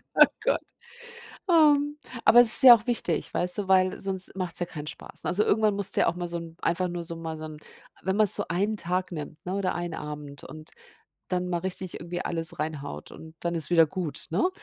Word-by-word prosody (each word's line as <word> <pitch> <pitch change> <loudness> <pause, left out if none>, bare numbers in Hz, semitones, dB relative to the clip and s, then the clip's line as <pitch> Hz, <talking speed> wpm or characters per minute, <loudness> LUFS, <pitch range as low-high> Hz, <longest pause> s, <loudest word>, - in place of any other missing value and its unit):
Oh, - - +9 0.2
Gott. - - +1 0.9
Ähm. 295 -3 +4 0.3
Aber 240 - +7
es 240 - +5
ist - - +7
ja 250 -2 +11
auch 230 +1 -3
wichtig, 225 -8 -1
weißt 180 +2 +2
du, 195 -2 -3
weil 185 -1 +3
sonst 190 -1 +2
macht's 180 -2 -2
ja 175 - -1
keinen 150 -3 -8
Spaß. - - -5
Also, 205 +4 +1
irgendwann 215 -1 +2
musst 200 0 +1
du - - +2
ja - - +3
auch 170 - -1
mal 175 0 -4
so 170 0 -4
'n 165 0 -10
einfach 180 +1 0
nur 175 -1 -5
so 165 0 -3
mal 160 -1 -6
so 155 - -8
'n 155 -1 -8 0.5
wenn 190 +2 -1
man 215 -1 +4
so - - +4
einen 200 +5 -1
Tag 180 0 -3
nimmt, 150 0 -8
ne, 185 +2 -4
oder 195 -2 -1
einen 175 -2 -4
Abend 150 -1 -8
und 155 +1 -11 0.6
dann 180 -1 -2
mal 175 -1 -1
richtig 185 0 -6
irgendwie 175 +1 -5
alles 165 -1 -1
reinhaut 145 - -5
und 160 0 -13
dann 170 0 -3
ist 160 -1 -2
wieder 165 -2 +5
gut, 170 -1 -5
ne? 210 - +1
175 Hz, 225 wpm, -26 LUFS, 165-195 Hz, 0.9 s, ja